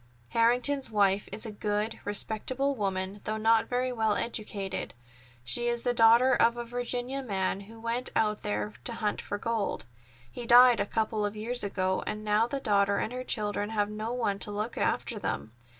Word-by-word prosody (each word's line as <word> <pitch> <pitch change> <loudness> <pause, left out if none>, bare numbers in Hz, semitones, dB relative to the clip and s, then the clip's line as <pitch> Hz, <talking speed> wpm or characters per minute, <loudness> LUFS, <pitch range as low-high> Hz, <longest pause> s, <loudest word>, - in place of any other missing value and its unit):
"Harrington's 250 +4 +2
wife 200 -2 +2
is 210 +4 -3
a 220 - -5
good, 210 +1 -2
respectable 235 +7 -1
woman, 195 -3 -3
though 215 0 -2
not 225 +1 +3
very 255 +1 0
well 220 -3 +1
educated. 210 - -3 0.5
She 240 - +1
is 240 0 0
the 245 - +1
daughter 235 +3 +6
of 235 +1 +3
a 240 - -4
Virginia 245 +2 -3
man 195 -6 -1
who 225 0 -12
went 235 +2 -2
out 210 -1 +1
there 105 0 -2
to - - -3
hunt 210 -2 -2
for 205 - -4
gold. 225 - -2 0.5
He 240 - -7
died 245 0 +8
a - - 0
couple 220 -1 -1
of 205 0 -2
years 235 +3 -1
ago, 190 -2 -1
and 215 0 -3
now 210 +2 +3
the 275 +3 -3
daughter 200 -4 +2
and 235 - -2
her 255 0 -4
children 210 -3 -2
have 210 -2 0
no 215 +2 -4
one 225 -5 -1
to - - -1
look 210 +3 -3
after - - -1
them. 70 +11 -3
220 Hz, 185 wpm, -29 LUFS, 205-240 Hz, 0.5 s, died